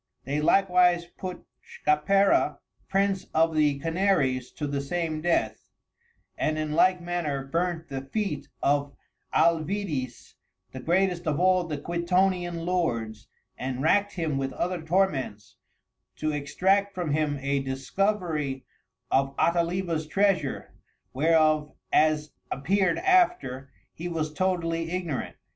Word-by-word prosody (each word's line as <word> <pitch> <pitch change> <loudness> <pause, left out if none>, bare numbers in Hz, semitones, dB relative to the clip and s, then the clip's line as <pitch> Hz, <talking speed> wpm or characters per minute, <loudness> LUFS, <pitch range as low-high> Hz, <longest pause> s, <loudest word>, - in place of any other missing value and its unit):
They 145 +3 -2
likewise 180 0 +4
put 180 +1 -8 0.2
Schapera, 195 +7 +2 0.3
Prince 195 -1 +1
of 165 +1 +3
the 150 -2 +2
Canaries 160 -6 +1
to 150 - -4
the 140 -1 -2
same 160 +1 -2
Death, 175 +1 0 0.7
and 155 0 0
in 155 -1 -2
like 180 +4 +4
manner, 170 -6 -3
burnt 170 +2 -2
the 135 -1 -4
Feet 150 0 -3 0.2
of 145 0 +1 0.4
Alvidis, 160 - 0 0.4
the 130 - -7
greatest 175 +3 +1
of 150 0 0
all 185 0 +3
the 155 -3 -4
Quitonian 175 +1 0
Lords, 115 -12 -2 0.3
and 130 +1 -3
rackt 205 +5 +3
him 160 -6 -1
with 135 -1 -3
other 180 +3 -2
Torments 155 - -1 0.6
to 155 0 -1
Extract 190 +7 +1
from 175 -5 -2
him 150 -1 0
a 140 +1 0
discovery 140 +1 -2 0.5
of 135 +1 +1
Ataliba's 170 -1 0
Treasure, 185 -4 0 0.4
whereof 155 +1 +2 0.2
as 155 -1 +3 0.2
appear'd 185 +6 +1
after, 355 - +2 0.2
he 170 - -6
was 155 -3 -3
totally 165 -1 -1
ignorant. 170 -6 -3
165 Hz, 120 wpm, -27 LUFS, 145-180 Hz, 0.7 s, likewise